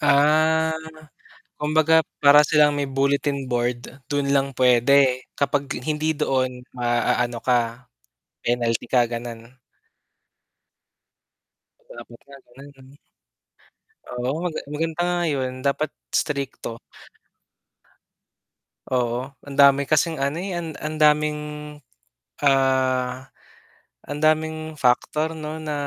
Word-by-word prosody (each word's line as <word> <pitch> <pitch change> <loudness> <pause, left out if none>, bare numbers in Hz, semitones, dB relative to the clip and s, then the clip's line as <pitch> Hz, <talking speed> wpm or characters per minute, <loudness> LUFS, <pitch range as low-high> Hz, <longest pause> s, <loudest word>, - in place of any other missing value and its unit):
Ah, 155 +2 +3 0.8
kumbaga 155 +1 +3 0.2
para 145 +1 +7
silang 150 -1 +3
may 145 - 0
bulletin 140 0 -1
board, 120 -1 -1 0.3
dun 140 -1 0
lang 135 0 +1
pwede 130 +1 +4 0.2
kapag 140 0 +1 0.2
hindi 155 +1 0
doon 130 -4 -1 0.2
maaano 120 0 0
ka, 120 -1 -1 0.6
penalty 120 -1 0
ka 120 -2 +3
ganun? 120 +1 -7 2.3
Dapat 120 0 -12
nga 140 0 -13
ganun, 135 +4 -14
mm. 135 +1 -18 1.1
Oo, 130 +7 -3
maga 165 -3 -3
maganda 160 +2 -3
nga 175 - 0
yun 130 -3 -2
dapat 140 +2 0 0.2
strikto. 140 -5 -3 2.1
Oo, 120 -2 0 0.3
ang 140 -1 -8
dami 140 0 +6
kasing 155 +2 +2
ano, 140 +3 -2
eh, 185 0 -4
ang 165 -1 -5 0.2
ang 155 0 -3
daming 150 0 +4 1.1
ah 130 -2 +2 0.8
ang 145 +1 -5
daming 155 0 0
factor 150 +5 +2
'no 155 -1 -7 0.2
na 150 - -3
140 Hz, 100 wpm, -23 LUFS, 125-150 Hz, 2.3 s, para